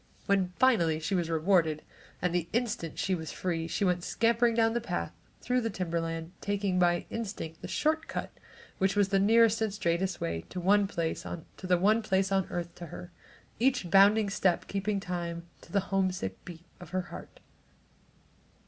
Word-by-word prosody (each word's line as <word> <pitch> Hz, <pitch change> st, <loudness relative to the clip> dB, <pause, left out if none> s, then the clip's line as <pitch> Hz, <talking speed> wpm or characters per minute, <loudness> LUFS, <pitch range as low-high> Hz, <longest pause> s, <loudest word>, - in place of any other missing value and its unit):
When 195 Hz, -2 st, +2 dB
finally 170 Hz, -12 st, +3 dB
she 160 Hz, +5 st, -3 dB
was 175 Hz, -3 st, 0 dB
rewarded, 160 Hz, -2 st, +2 dB, 0.4 s
and 180 Hz, -1 st, +1 dB
the 175 Hz, -2 st, -1 dB
instant 215 Hz, -9 st, -2 dB
she 190 Hz, -, 0 dB
was 160 Hz, -4 st, -3 dB
free, 165 Hz, -3 st, -2 dB
she 200 Hz, -, -1 dB
went 180 Hz, -1 st, +1 dB
scampering 230 Hz, +2 st, +2 dB
down 225 Hz, -1 st, +3 dB
the 235 Hz, -, 0 dB
path, 85 Hz, -, -3 dB, 0.3 s
through 250 Hz, 0 st, +1 dB
the 225 Hz, -, -1 dB
timberland, 165 Hz, -3 st, -3 dB
taking 200 Hz, -2 st, 0 dB
by 175 Hz, -1 st, +2 dB
instinct 195 Hz, -8 st, -5 dB
the -, -, -6 dB
"short 315 Hz, +1 st, 0 dB
cut" -, -, -4 dB, 0.5 s
which 190 Hz, +1 st, +2 dB
was 205 Hz, -1 st, +3 dB
the 195 Hz, -1 st, +3 dB
nearest 225 Hz, +2 st, +4 dB
and 220 Hz, -2 st, +1 dB
straightest 185 Hz, -1 st, -1 dB
way 85 Hz, 0 st, -2 dB
to -, -, -8 dB
the 180 Hz, -, -4 dB
one 205 Hz, +1 st, +4 dB
place 165 Hz, -2 st, -2 dB
on 170 Hz, -2 st, -7 dB, 1.0 s
earth 175 Hz, -1 st, -4 dB
to 175 Hz, -, -9 dB
her, 175 Hz, +3 st, -9 dB, 0.5 s
each 240 Hz, -8 st, +1 dB
bounding 200 Hz, +1 st, +6 dB
step 185 Hz, -3 st, +1 dB
keeping 200 Hz, +1 st, -1 dB
time 170 Hz, -2 st, -4 dB, 0.2 s
to -, -, -16 dB
the 200 Hz, -, +3 dB
homesick 185 Hz, -, -1 dB
beat 170 Hz, -1 st, -10 dB
of 180 Hz, -, -11 dB
her 185 Hz, 0 st, -1 dB
heart. -, -, -10 dB
185 Hz, 170 wpm, -30 LUFS, 170-205 Hz, 1.0 s, bounding